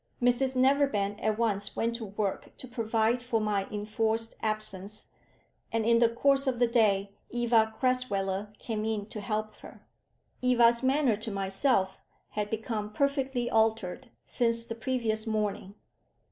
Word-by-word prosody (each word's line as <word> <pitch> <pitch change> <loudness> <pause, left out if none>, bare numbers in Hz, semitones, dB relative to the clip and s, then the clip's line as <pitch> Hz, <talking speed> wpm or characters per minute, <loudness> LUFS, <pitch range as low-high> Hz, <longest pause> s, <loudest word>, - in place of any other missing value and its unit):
Mrs 250 +2 +3
Neverbend 255 -7 +2
at 215 -1 +1
once 205 -3 -1
went 230 +1 0
to 230 - -6
work 200 -1 -4
to 260 - -8
provide 230 0 0
for 245 -2 -1
my 205 -2 -1
enforced 220 +2 -2
absence, 215 -1 -1 0.6
and 225 -1 0
in 230 0 +4
the 235 -1 +5
course 275 +4 +2
of 255 -2 +1
the 245 - +4
day 205 -4 +2 0.2
Eva 230 -2 +2
Crasweller 205 -6 0
came 215 -2 -4
in 215 -2 -2
to 210 - -6
help 215 +1 -3
her. - - -14 0.6
Eva's 240 -2 +4
manner 260 -4 +2
to 220 +2 -6
myself 195 0 +1 0.3
had 210 -1 -3
become 220 -1 -3
perfectly 265 0 0
altered 220 +1 0 0.2
since 230 -1 +1
the 230 - -5
previous 230 -2 -1
morning. 210 -2 -2
225 Hz, 145 wpm, -29 LUFS, 210-245 Hz, 0.6 s, the